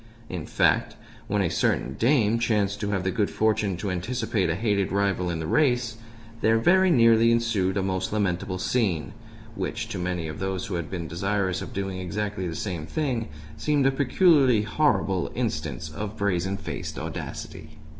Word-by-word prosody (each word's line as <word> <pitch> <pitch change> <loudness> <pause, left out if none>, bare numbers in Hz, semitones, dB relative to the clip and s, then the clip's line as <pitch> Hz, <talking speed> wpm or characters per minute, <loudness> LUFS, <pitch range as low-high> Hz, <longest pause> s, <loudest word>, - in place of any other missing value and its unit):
In 90 -4 -5
fact, - - +2 0.3
when 100 0 +1
a 90 - +1
certain 65 -4 0
dame 115 - +2
chanced 105 -3 +1
to 105 - -2
have 95 -3 -1
the 95 - 0
good 100 +2 0
fortune 105 -4 +1
to 100 +1 -3
anticipate 110 +1 -1
a 80 - +1
hated 100 -1 0
rival 100 -2 +1
in 85 - -2
the 80 - -4
race 125 - +1 0.4
there 110 +1 +4
very 185 +10 +4
nearly 115 -5 +5
ensued 110 -5 +1
a 95 - +1
most 95 -1 -1
lamentable 100 -2 -1
scene 100 -4 0 0.4
which, 115 0 -4
to 100 - -4
many 90 -2 -2
of 75 - -7
those 95 -1 -2
who 100 - -5
had 85 -3 -3
been 85 -3 -4
desirous 95 +1 -1
of - - -7
doing 95 -1 -3
exactly 100 +1 -3
the 85 - -4
same 90 -7 -4
thing, 130 -7 -2 0.3
seemed 145 - +1
a 135 - +5
peculiarly 135 - +4
horrible 105 - +1
instance 80 - -3
of 105 +4 -5
brazen 95 -1 0
faced 100 - -6
audacity. - - -7
100 Hz, 175 wpm, -26 LUFS, 90-115 Hz, 0.4 s, nearly